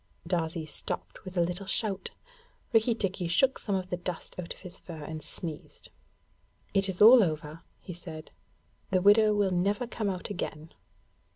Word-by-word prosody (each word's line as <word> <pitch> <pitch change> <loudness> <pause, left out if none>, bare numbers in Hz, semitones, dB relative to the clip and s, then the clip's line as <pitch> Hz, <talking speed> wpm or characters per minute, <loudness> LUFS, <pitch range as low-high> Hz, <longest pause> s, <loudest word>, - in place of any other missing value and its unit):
Darzee 165 -2 -1
stopped 150 - -5
with 185 -1 -8
a - - +4
little 180 +3 -2
shout. 195 -1 -1 0.6
Rikki 225 +1 +4
tikki 190 -5 -2
shook 260 +11 +3
some 200 - -1
of 185 -1 -3
the 180 - 0
dust 175 -1 -5
out 170 - -6
of - - -7
his 180 -1 -10
fur 160 -4 -9
and 155 +1 -6
sneezed. 155 0 -8 0.8
'It 195 -1 +3
is 190 +2 +3
all 240 +3 +10
over,' 155 -1 -3 0.2
he 180 - -8
said. 165 -2 -9 0.6
'The 185 -2 +2
widow 210 +1 +6
will 200 -2 +2
never 200 +6 +1
come 220 -3 -2
out 185 +1 -4
again.' 160 -4 -5
180 Hz, 170 wpm, -29 LUFS, 170-205 Hz, 0.8 s, all